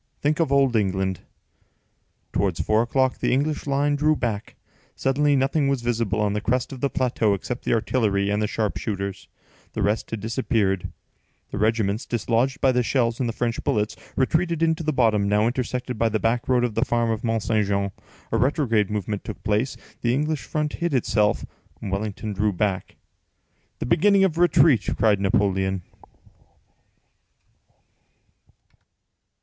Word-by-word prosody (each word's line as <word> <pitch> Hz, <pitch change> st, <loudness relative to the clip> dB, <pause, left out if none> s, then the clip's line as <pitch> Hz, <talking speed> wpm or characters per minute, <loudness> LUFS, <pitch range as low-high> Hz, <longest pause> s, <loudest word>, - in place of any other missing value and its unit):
Think 150 Hz, +2 st, 0 dB
of 160 Hz, -5 st, +1 dB
old 135 Hz, -3 st, +3 dB
England!" 95 Hz, -3 st, 0 dB, 1.1 s
Towards 95 Hz, -5 st, 0 dB
four 110 Hz, +1 st, +2 dB
o'clock, 130 Hz, +2 st, +1 dB
the -, -, 0 dB
English 145 Hz, +3 st, 0 dB
line 140 Hz, +1 st, +1 dB
drew 155 Hz, +2 st, +2 dB
back. 110 Hz, -6 st, -3 dB, 0.4 s
Suddenly 145 Hz, +2 st, +2 dB
nothing 135 Hz, +2 st, +1 dB
was 135 Hz, -3 st, 0 dB
visible 115 Hz, -3 st, 0 dB
on 105 Hz, -1 st, +1 dB
the 105 Hz, -, -2 dB
crest 125 Hz, +4 st, -1 dB
of 130 Hz, -, -9 dB
the 140 Hz, -, +1 dB
plateau 120 Hz, -6 st, +1 dB
except 120 Hz, +6 st, -6 dB
the -, -, +1 dB
artillery 105 Hz, -4 st, +1 dB
and 105 Hz, +1 st, 0 dB
the 105 Hz, -, +1 dB
sharpshooters; 100 Hz, -2 st, -3 dB, 0.5 s
the -, -, -2 dB
rest 105 Hz, +2 st, 0 dB
had 115 Hz, -, -4 dB
disappeared: 110 Hz, -4 st, -1 dB, 0.6 s
the -, -, -4 dB
regiments, 110 Hz, -1 st, 0 dB
dislodged 120 Hz, +4 st, 0 dB
by 135 Hz, -, +4 dB
the 125 Hz, 0 st, +2 dB
shells 120 Hz, -2 st, 0 dB
and 125 Hz, -3 st, 0 dB
the -, -, -3 dB
French 120 Hz, 0 st, -2 dB
bullets, 105 Hz, 0 st, 0 dB, 0.2 s
retreated 165 Hz, +4 st, +1 dB
into 160 Hz, 0 st, +1 dB
the 155 Hz, -1 st, 0 dB
bottom, 110 Hz, -7 st, +2 dB
now 105 Hz, +1 st, +3 dB
intersected 125 Hz, 0 st, -2 dB
by 115 Hz, -, +3 dB
the 110 Hz, -, 0 dB
back 115 Hz, +3 st, 0 dB
road 125 Hz, -1 st, +3 dB
of 120 Hz, -3 st, 0 dB
the -, -, +1 dB
farm 120 Hz, -1 st, 0 dB
of 110 Hz, -, -3 dB
Mont 115 Hz, -2 st, 0 dB
Saint 110 Hz, -2 st, +1 dB
Jean; 100 Hz, 0 st, 0 dB, 0.4 s
a 115 Hz, -, +2 dB
retrograde 120 Hz, -5 st, +1 dB
movement 105 Hz, -1 st, -3 dB
took -, -, -8 dB
place, 110 Hz, +5 st, 0 dB, 0.2 s
the 120 Hz, +1 st, +1 dB
English 150 Hz, +1 st, -1 dB
front 150 Hz, -1 st, -2 dB
hid 170 Hz, -4 st, 0 dB
itself, 105 Hz, -4 st, +1 dB, 0.3 s
Wellington 105 Hz, +1 st, -4 dB
drew 105 Hz, +2 st, +1 dB
back. 95 Hz, 0 st, -2 dB, 0.8 s
"The -, -, -4 dB
beginning 195 Hz, -, +4 dB
of 170 Hz, -4 st, +1 dB
retreat!" 150 Hz, -, +4 dB
cried 105 Hz, -1 st, +3 dB
Napoleon. 95 Hz, -1 st, +1 dB
115 Hz, 160 wpm, -24 LUFS, 105-135 Hz, 1.1 s, by